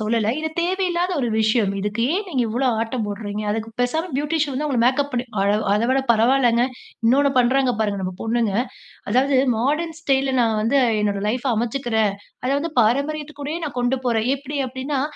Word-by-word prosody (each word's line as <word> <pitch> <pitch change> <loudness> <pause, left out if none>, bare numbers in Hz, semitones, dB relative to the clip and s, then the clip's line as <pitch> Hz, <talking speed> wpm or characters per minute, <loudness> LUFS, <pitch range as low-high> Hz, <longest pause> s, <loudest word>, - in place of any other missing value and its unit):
சொல்லல. 220 0 +1
இது 315 - -2
தேவையில்லாத 360 0 0
ஒரு 245 - 0
விஷயம், 220 -2 +2
இதுக்கு 210 +3 -1
ஏன் 405 +3 -1
நீங்க 265 -8 0
இவ்வளோ 250 +4 0
ஆட்டம் 230 0 -2
போட்றீங்க? 205 0 -4
அதுக்கு 225 +1 -3
பேசாம 315 +8 0
பியூட்டிஷியன் 295 0 0
வந்து 295 +4 -1
அவங்கள 260 -5 0
மேக்கப் 275 +3 +2
பண்ணி 245 0 -1 0.2
அழ 200 +1 +2 0.2
அத 210 - +1
விட 265 +1 +3
பரவால்லங்க. 240 +1 +3 0.4
இன்னொன்னு 275 +3 +4
பண்ணுறாங்க 255 0 +3
பாருங்க 205 -2 0
நம்ம 185 0 -3
பொண்ணுங்க. 225 -3 0 0.6
அதாவது 265 +4 +3 0.2
மாடர்ன் 305 +7 -1
ஸ்டைல்ல 270 -3 +1
நான் 225 -2 +2
வந்து 250 +6 +2 0.2
என்னோட 205 -1 0
லைஃப்ப 250 +3 0
அமைச்சுக்கிறேன். 225 -3 0 0.3
அத 255 - 0
வந்து 320 +2 -4
பாரம்பரியத்துக்கூடயே 290 +5 -1
நான் 290 - -6
கொண்டு 245 +2 +1
போறேன். 225 -1 +1
எப்டி 285 +1 -6
அப்டின்னா? 265 +2 -3
250 Hz, 170 wpm, -22 LUFS, 225-285 Hz, 0.6 s, இன்னொன்னு